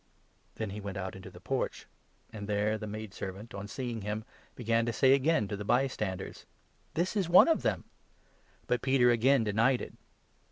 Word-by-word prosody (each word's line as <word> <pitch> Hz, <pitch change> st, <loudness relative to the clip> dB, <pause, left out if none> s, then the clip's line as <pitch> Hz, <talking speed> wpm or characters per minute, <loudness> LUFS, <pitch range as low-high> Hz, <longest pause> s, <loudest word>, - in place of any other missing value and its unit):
Then 110 Hz, -3 st, -4 dB
he 105 Hz, +1 st, -6 dB
went 100 Hz, 0 st, -5 dB
out 95 Hz, -1 st, -4 dB
into 95 Hz, -, -9 dB
the -, -, -13 dB
porch; -, -, -2 dB, 0.5 s
and 105 Hz, -2 st, -6 dB
there 105 Hz, +1 st, +1 dB
the 110 Hz, -, -5 dB
maidservant, 105 Hz, 0 st, -7 dB
on 100 Hz, +1 st, -6 dB
seeing 120 Hz, -1 st, -4 dB
him, 105 Hz, +2 st, -4 dB, 0.3 s
began 115 Hz, -1 st, +1 dB
to -, -, +1 dB
say 130 Hz, +3 st, +5 dB
again 140 Hz, -5 st, +2 dB
to 105 Hz, -, -2 dB
the 100 Hz, -, -5 dB
by 125 Hz, +6 st, +3 dB
standers: 95 Hz, -7 st, -5 dB, 0.2 s
" -, -, -38 dB
This 175 Hz, +5 st, 0 dB
is 190 Hz, -5 st, 0 dB
one 180 Hz, -, +8 dB
of 325 Hz, -, +3 dB
them! -, -, 0 dB, 0.4 s
" -, -, -34 dB
But 125 Hz, -, 0 dB
Peter 130 Hz, -2 st, +4 dB
again 120 Hz, +2 st, +4 dB
denied 115 Hz, +5 st, +2 dB
it. -, -, -7 dB
110 Hz, 195 wpm, -31 LUFS, 105-130 Hz, 0.5 s, one